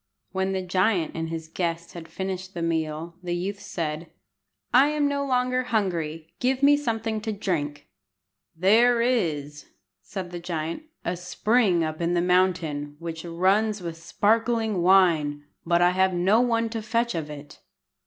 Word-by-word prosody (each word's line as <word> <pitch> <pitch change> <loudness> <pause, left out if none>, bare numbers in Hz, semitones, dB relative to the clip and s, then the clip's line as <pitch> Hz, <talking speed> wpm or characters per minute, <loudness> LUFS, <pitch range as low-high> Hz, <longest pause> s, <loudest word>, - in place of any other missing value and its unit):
When 190 0 -1
the 190 -1 -2
giant 185 -1 +1
and 165 0 -3
his 165 -1 -5
guest 170 0 -3
had 170 -2 -9
finished 190 +2 -5
the 170 - -3
meal, 165 0 -2
the 175 -1 -2
youth 195 +3 -3
said 165 -5 -4 0.6
"I 260 +3 +7
am 300 -1 +1
no 280 0 -1
longer 255 -1 +1
hungry. 165 -8 -2
Give 260 +2 0
me 290 +1 +7
something 225 -5 -2
to 220 0 -3
drink." 150 -8 -3 0.7
"There 230 +7 +4
is," 155 - -1 0.3
said 185 -3 -6
the 175 - -5
giant, 165 - -4 0.2
"a 175 - -1
spring 180 +1 +1
up 155 +1 -4
in 170 +1 +1
the - - +3
mountain 170 -5 +1
which 165 0 -6
runs 190 +4 +1
with 170 -1 -4
sparkling 220 +3 +1
wine, 170 -6 +4 0.2
but 170 0 +4
I 175 - +5
have 190 0 +2
no 195 +6 +4
one 230 -2 +1
to 225 0 -4
fetch 230 +2 0
of 160 -3 -4
it." 145 -1 -10
180 Hz, 160 wpm, -25 LUFS, 165-220 Hz, 0.7 s, I